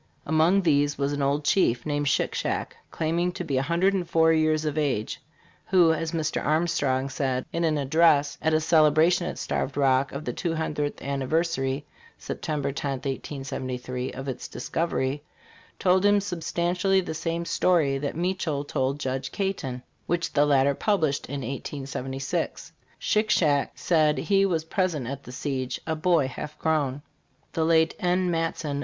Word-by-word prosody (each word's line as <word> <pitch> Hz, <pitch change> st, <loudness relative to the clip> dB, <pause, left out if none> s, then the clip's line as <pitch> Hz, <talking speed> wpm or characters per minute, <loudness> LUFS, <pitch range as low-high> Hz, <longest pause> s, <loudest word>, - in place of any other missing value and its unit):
Among 160 Hz, +6 st, +3 dB
these 145 Hz, -3 st, +2 dB
was 140 Hz, 0 st, 0 dB
an 145 Hz, -, -2 dB
old 140 Hz, +2 st, 0 dB
chief 125 Hz, -12 st, +2 dB
named 145 Hz, -1 st, -1 dB
Shick 140 Hz, -, +1 dB
Shack* -, -, -2 dB
claiming 170 Hz, +3 st, 0 dB
to 180 Hz, -, -4 dB
be 140 Hz, -6 st, -1 dB
104 170 Hz, +2 st, +2 dB
years 155 Hz, -1 st, +2 dB
of 150 Hz, -1 st, -1 dB
age, 140 Hz, -8 st, -1 dB, 0.5 s
who, 175 Hz, -3 st, +5 dB
as 160 Hz, 0 st, -2 dB
Mr. 160 Hz, -2 st, -1 dB
Arm 155 Hz, +3 st, +2 dB
strong 135 Hz, -5 st, 0 dB
said, 130 Hz, -2 st, -2 dB
in 170 Hz, -, 0 dB
an 155 Hz, -2 st, +2 dB
address* 145 Hz, 0 st, +3 dB
at 160 Hz, -, +2 dB
a 155 Hz, -, +3 dB
celebration 160 Hz, +2 st, +4 dB
at -, -, -5 dB
Starved 135 Hz, +1 st, -2 dB
Rock, 135 Hz, -1 st, +3 dB
of 140 Hz, +3 st, -6 dB
the -, -, -2 dB
two 165 Hz, -2 st, -2 dB
hun 160 Hz, -1 st, -2 dB
dredth 145 Hz, -1 st, -3 dB
anniversary 140 Hz, 0 st, -1 dB, 0.3 s
(September 145 Hz, -3 st, -3 dB
10, 140 Hz, 0 st, -3 dB
1873) 130 Hz, -2 st, -4 dB
of 135 Hz, +1 st, -7 dB
its 130 Hz, -2 st, -5 dB
discovery, 140 Hz, +1 st, -2 dB, 0.6 s
told 185 Hz, 0 st, +3 dB
him 205 Hz, 0 st, +5 dB
substan 175 Hz, -3 st, -1 dB
tially 190 Hz, +1 st, +2 dB
the -, -, -4 dB
same 165 Hz, +1 st, -3 dB
story 165 Hz, -5 st, +2 dB
that 140 Hz, 0 st, -3 dB
Meachelle 175 Hz, -5 st, -1 dB
told 135 Hz, 0 st, -1 dB
Judge 130 Hz, -1 st, -3 dB
Caton, 135 Hz, -11 st, -3 dB, 0.2 s
which 170 Hz, -1 st, -1 dB
the 145 Hz, 0 st, +4 dB
latter 140 Hz, -1 st, +4 dB
pub 205 Hz, +6 st, 0 dB
lished 145 Hz, -3 st, 0 dB
in 140 Hz, +1 st, -4 dB
1876. 135 Hz, +1 st, -4 dB, 0.3 s
Shick 215 Hz, 0 st, +1 dB
Shack 145 Hz, -8 st, +2 dB
said 155 Hz, -3 st, +2 dB
he 195 Hz, -1 st, +2 dB
was 165 Hz, -4 st, -1 dB
present 165 Hz, -6 st, -1 dB
at 140 Hz, +3 st, -5 dB
the -, -, -9 dB
siege, 130 Hz, -2 st, -3 dB
a 160 Hz, -, -1 dB
boy 160 Hz, -3 st, +2 dB
half 150 Hz, +3 st, -7 dB
grown. 145 Hz, -3 st, 0 dB, 0.5 s
The 160 Hz, -, 0 dB
late 160 Hz, 0 st, +3 dB
N. 180 Hz, 0 st, +1 dB
Matson. 165 Hz, -3 st, -2 dB
155 Hz, 165 wpm, -26 LUFS, 140-170 Hz, 0.6 s, who